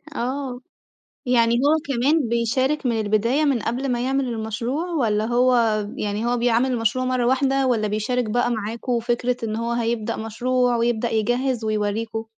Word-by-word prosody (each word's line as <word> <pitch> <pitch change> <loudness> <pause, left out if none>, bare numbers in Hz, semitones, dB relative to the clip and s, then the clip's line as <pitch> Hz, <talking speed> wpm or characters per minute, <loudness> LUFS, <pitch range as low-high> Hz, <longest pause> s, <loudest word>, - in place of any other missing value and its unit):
آه، 255 0 -3 0.7
يعني 235 -2 +3
هو 285 +5 +3
كمان 275 +1 +1
بيشارك 260 +5 0
من 230 -2 +1
البداية 220 +7 +1
من 275 -5 +2
قبل 250 +3 -2
ما 240 +1 -1
يعمل 270 +1 0
المشروع 230 +7 -3
والّا 220 -9 +1
هو 250 +1 +3 0.4
يعني 210 +2 -2
هو 245 - +1
بيعمل 240 +2 +2
المشروع 235 +2 0
مرّة 255 -1 0
واحدة، 270 +1 +2
والّا 225 -4 +1
بيشارك 215 +3 -1
بقى 240 +2 +1
معاكوا 230 +2 -2
وفكرة 240 +1 0
إن 215 -1 -2
هو 230 +1 -2
هيبدأ 230 -1 -1
مشروع 245 +2 0
ويبدأ 235 0 0
يجهز 240 +2 0
ويوريكم؟ 215 +1 -2
240 Hz, 155 wpm, -22 LUFS, 225-255 Hz, 0.7 s, يعني